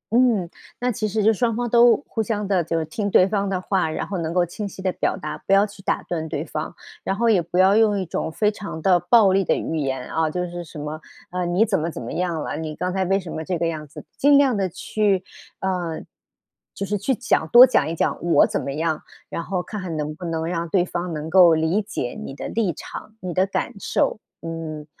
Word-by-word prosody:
嗯， 230 -8 +3 0.3
那 250 +1 0
其 215 -1 -2
实 215 0 -1
就 220 +1 +5
双 230 0 0
方 240 +1 -2
都 235 0 +6
互 225 - -2
相 210 -2 -2
的 190 -3 +2
就 165 +1 -2
是 160 - -2
听 200 +6 -3
对 185 - +5
方 200 -1 -1
的 185 -2 -1
话， 185 -3 0
然 155 - -3
后 195 - -3
能 165 0 -3
够 180 -1 +3
清 200 +5 -5
晰 190 - -10
地 190 -1 0
表 - - -1
达， 190 - -5
不 - - +3
要 200 +1 +6
去 205 -2 -12
打 - - -1
断 160 -2 -3
对 - - -3
方。 - - -5 0.3
然 195 - -1
后 235 +3 +1
也 200 -5 +4
不 170 +2 -4
要 190 +2 +5
用 210 -2 +4
一 185 - -2
种 160 - -3
非 210 +5 +1
常 200 -6 -7
的 180 0 +4
暴 200 +2 +5
力 195 +1 +3
的 - - +2
语 160 - -3
言， 135 -4 -2
啊， 160 -1 +1
就 180 +3 -2
是 175 0 -6
什 155 - -12
么， 150 +2 -5 0.3
呃， 180 0 -2
“你 180 +6 +3
怎 205 -5 0
么 160 +2 -2
怎 160 - -7
么 115 - -6
样 170 -2 -1
了， - - -4
你 155 -1 -5
刚 180 +3 -2
才 190 0 0
为 195 +2 +2
什 180 -4 -8
么 160 - -4
这 180 +2 -2
个 170 - -1
样 155 -2 -4
子？” 140 - -11
尽 285 0 +5
量 270 -4 +4
的 195 -2 0
去 195 +1 0 0.4
呃， 180 -4 -2 0.7
就 195 - -3
是 205 +2 -1
去 260 +6 0
讲 160 - 0
多 245 +2 +10
讲 255 - +2
一 165 - -3
讲 - - -1
我 175 - +5
怎 - - -2
么 140 - -4
样， 160 0 -1 0.3
然 170 - -4
后 180 0 -2
看 210 +1 -6
看 175 -3 -4
能 150 0 -3
不 180 - -11
能 165 -1 -2
让 170 0 -2
对 180 0 +2
方 175 -1 -4
能 155 0 -5
够 175 -2 +7
理 160 +6 +1
解 200 - -4
你 135 - -7
的 - - -6
立 210 -7 0
场、 215 - -9
你 180 -2 -4
的 185 +2 +3
感 235 - -2
受。 205 - 0 0.2
嗯， 165 -2 -6
180 Hz, 270 characters per minute, -23 LUFS, 165-205 Hz, 0.7 s, 多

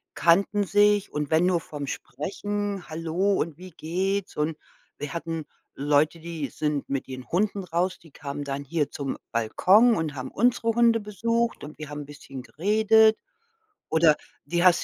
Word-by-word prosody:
kannten 200 +4 +3
sich 205 0 +3
und 150 -1 -2
wenn 160 +2 +4
nur 175 -2 +2
vom 145 -3 -7
sprechen: 205 +6 -4
„Hallo 165 +5 0
und 160 -2 -2
wie 185 +1 -11
geht's?“ 185 +5 -2
Und 150 +1 -1 0.4
wir 145 - -5
hatten 165 -2 -4 0.3
Leute, 145 +3 +2
die 165 -3 -4
sind 150 0 -2
mit 135 -1 -2
ihren 130 -1 -7
Hunden 200 +2 0
raus, 175 +2 -1
die 165 -3 -18
kamen 145 0 -6
dann 140 0 -3
hier 150 0 -1
zum 140 -2 -4 0.2
Balkon 190 - +4
und 155 -3 -2
haben 130 -1 -6
unsere 235 0 +2
Hunde 230 0 +4
besucht 230 +3 -1
und 150 - -11
wir 155 -1 -7
haben 150 0 -5
'n - - -12
bisschen 135 -3 -9
geredet. 220 - +4 0.7
Oder 160 -1 +5 0.3
die 170 +4 0
hast 180 -2 +5
170 Hz, 165 wpm, -26 LUFS, 150-200 Hz, 0.7 s, Oder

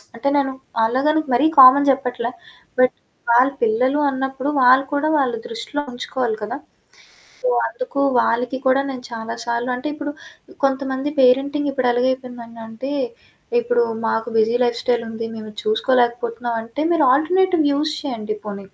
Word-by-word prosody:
అంటే 230 +4 -2
నేను 275 -2 +1 0.3
అలాగనికి 290 +5 +1
మరీ 280 +6 +3
కామన్ 275 +2 +8
చెప్పట్ల. 250 -3 -1 0.5
బట్ 255 0 +4 0.4
వాళ్ళ 250 +3 +5
పిల్లలు 250 +6 +2
అన్నప్పుడు 265 +1 -3
వాళ్ళు 260 +2 +6
కూడా 295 +2 +1
వాళ్ళ 260 -3 +1
దృష్టిలో 230 +6 -4
ఉంచుకోవాలి 245 -2 -3
కదా! 235 +5 -4 0.8
సో - - -1 0.2
అందుకు - - -5 0.2
వాళ్ళకి 245 +2 0
కూడా 260 +1 +4
నేను 255 -2 -7
చాలా 230 0 -5
సార్లు 235 +1 -2
అంటే 255 +5 -4
ఇప్పుడు 295 -1 -5 0.5
కొంతమంది 270 +1 -1
పేరెంటింగ్ 280 +3 +3
ఇప్పుడు 255 -2 0
ఎలాగైపోయిందడింటే, 245 -1 -4 0.7
ఇప్పుడు 475 0 +1 0.2
మాకు 225 +1 -1
బిజీ 225 +2 +2
లైఫ్ 240 -1 -1
స్టైల్ 240 -1 +1
ఉంది. 225 0 -5
మేము 215 -1 -8
చూసుకోలేకపోతున్నాం 235 +1 0
అంటే. 230 +5 -7
మీరు 320 -4 +3
ఆల్టర్నేటివ్ 345 +1 +2
యూజ్ 300 +2 0
చేయండి 220 -6 -4
పోనీ. 200 -1 -6
255 Hz, 140 wpm, -20 LUFS, 235-280 Hz, 0.8 s, కామన్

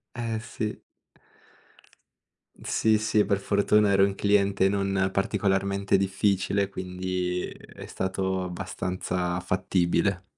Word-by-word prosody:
Eh 115 -2 -2
sì. 110 -1 -5 1.8
Sì, 110 -1 +2
sì, 110 0 +1
e - - +4
per 100 0 +1
fortuna 100 +1 +2
ero 95 0 +5
un 100 0 0
cliente 100 -1 +2
non 95 -1 0
particolarmente 100 0 +1
difficile, 100 0 +1
quindi 90 -1 -3
è - - -12
stato 95 0 -2
abbastanza 90 0 -3
fattibile. 95 +1 0
95 Hz, 105 wpm, -26 LUFS, 95-100 Hz, 1.8 s, ero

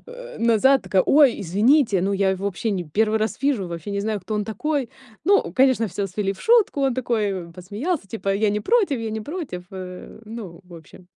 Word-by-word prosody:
э, - - -10
назад, 235 +4 +4
такая: 190 -2 +2
"Ой, 285 -4 +4
извините". 210 - +3
Ну, 195 +2 0
я 195 -1 +2
его 190 +1 -3
вообще 200 +3 -2
не 185 -3 -2
1 215 +7 +1
раз 220 +3 -2
вижу, 255 -10 +1
вообще 170 +3 -6
не 200 - -2
знаю, 210 -1 -2
кто 215 +4 -5
он 210 -1 -1
такой. 280 +3 -2 0.4
Ну, 405 +1 +3
конечно, 260 -4 +3
всё 195 +2 -3
свели 195 +1 -2
в - - -15
шутку, 450 -10 +3
он 265 -3 +1
такой 205 -9 -2
посмеялся, 210 - -4
типа: 200 -2 -2
"Я 210 +1 +1
не 210 +1 -1
против, 390 - +2
я 225 -1 -4
не 220 0 -4
против, 290 - -6
э". 185 +2 -9
Ну, 210 -6 -9
в 180 -1 -14
общем. 165 +2 -15
215 Hz, 210 wpm, -23 LUFS, 190-265 Hz, 0.4 s, назад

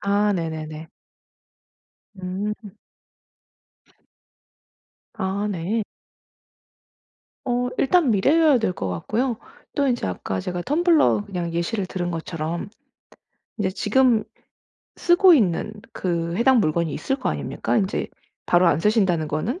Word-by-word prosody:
아 205 +1 +2
네네네. 160 -3 -4 1.3
음. 200 +3 -5 2.4
아 200 -1 -2
네. 195 +5 -1 1.6
어 245 0 0
일단 305 0 +3
미래여야 285 +7 +4
될 220 -5 0
것 95 - -4
같고요. 225 - -1 0.4
또 285 -2 +1
인제 245 -1 0
아까 95 +1 -3
제가 180 - -4
텀블러 310 - +3
그냥 175 -4 -4
예시를 185 +4 -1
들은 175 -1 -3
것처럼 165 0 -4 0.9
인제 195 -3 0
지금 220 +3 +2 0.7
쓰고 350 +1 +6
있는 210 - +1 0.2
그 170 -2 -2
해당 250 +3 +4
물건이 160 -3 0
있을 265 - -2
거 - - -2
아닙니까? - - -2
인제 200 -3 0 0.4
바로 175 +1 +4
안 160 -2 +3
쓰신다는 190 -6 +2
거는? 195 - -2
200 Hz, 215 characters per minute, -23 LUFS, 170-240 Hz, 2.4 s, 쓰고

